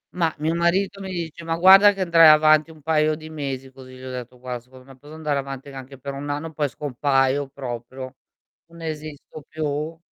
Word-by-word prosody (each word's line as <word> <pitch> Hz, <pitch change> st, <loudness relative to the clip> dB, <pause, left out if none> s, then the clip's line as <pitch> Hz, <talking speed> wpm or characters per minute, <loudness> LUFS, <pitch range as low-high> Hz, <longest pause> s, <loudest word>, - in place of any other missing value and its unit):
Ma 170 Hz, -3 st, +1 dB
mio 155 Hz, +2 st, -1 dB
marito 190 Hz, +4 st, 0 dB
mi 190 Hz, -, -6 dB
dice: 170 Hz, -2 st, -5 dB
"Ma 165 Hz, 0 st, -2 dB
guarda 195 Hz, +3 st, +8 dB
che 195 Hz, -1 st, -6 dB
andrai 165 Hz, -3 st, +6 dB
avanti 155 Hz, 0 st, +6 dB
un 155 Hz, -2 st, -15 dB
paio 155 Hz, 0 st, +2 dB
di 155 Hz, 0 st, -11 dB
mesi 135 Hz, -3 st, -5 dB
così" 130 Hz, -1 st, -13 dB
Gli 130 Hz, -, -13 dB
ho 130 Hz, -, -6 dB
detto: 125 Hz, 0 st, -7 dB
"Guar 125 Hz, -1 st, -6 dB
secondo 130 Hz, +1 st, -17 dB
me 135 Hz, 0 st, -15 dB
posso 145 Hz, +4 st, -14 dB
andare 150 Hz, -3 st, -1 dB
avanti 135 Hz, 0 st, -7 dB
anche 135 Hz, 0 st, -10 dB
per 140 Hz, +2 st, -6 dB
1 140 Hz, +1 st, -6 dB
anno 150 Hz, +3 st, -4 dB
poi 145 Hz, -1 st, -1 dB
scompaio 135 Hz, 0 st, 0 dB
proprio. 130 Hz, -1 st, -7 dB, 0.5 s
Non 170 Hz, 0 st, -15 dB
esisto 155 Hz, -1 st, -7 dB
più." 155 Hz, +1 st, -3 dB
150 Hz, 200 wpm, -23 LUFS, 135-160 Hz, 0.5 s, guarda